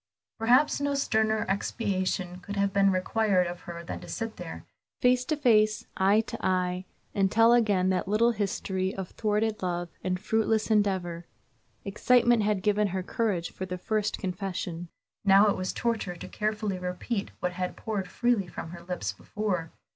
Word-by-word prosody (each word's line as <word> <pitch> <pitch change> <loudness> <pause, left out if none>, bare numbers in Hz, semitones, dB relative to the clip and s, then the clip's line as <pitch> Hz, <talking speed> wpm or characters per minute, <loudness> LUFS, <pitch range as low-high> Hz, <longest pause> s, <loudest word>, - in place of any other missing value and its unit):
Perhaps 250 +6 +4
no 285 0 0
sterner 220 -5 +1
expiation 185 -3 -1
could 200 +3 -7
have 200 -1 +1
been 195 0 +4
required 185 0 +2
of 175 0 -5
her 170 0 -6
than - - -6
to - - -11
sit 225 -1 -4
there, - - -8 0.3
face 250 0 +3
to 310 +2 -1
face, 215 -6 +3
eye 200 +3 +4
to 225 - -8
eye, 180 0 0 0.3
and 195 -2 +2
tell 230 +1 +6
again 205 -6 +3
that 185 0 -1
little 220 +4 +3
history 195 -3 -2
of 190 -2 -5
thwarted 215 0 0
love 175 -1 -2
and 180 -1 -1
fruitless 220 +2 +1
endeavor. 185 -5 0 0.6
Excitement 240 +3 +3
had 205 -2 0
given 210 0 +2
her 190 -1 -3
courage 190 -5 -1
for 190 - -6
the 180 0 -4
first 215 +3 -1
confession, 180 -2 -4 0.3
now 200 +1 +6
it - - +1
was 185 0 -2
torture 225 -6 -2
to 170 - -8
carefully 210 -3 -2
repeat 180 +4 -3
what 180 - -1
had 180 0 -3
poured 205 -4 -3
freely 235 -1 +1
from 165 -1 -7
her 170 0 -9
lips 170 - -3
before. 180 - -3
200 Hz, 170 wpm, -28 LUFS, 180-220 Hz, 0.6 s, tell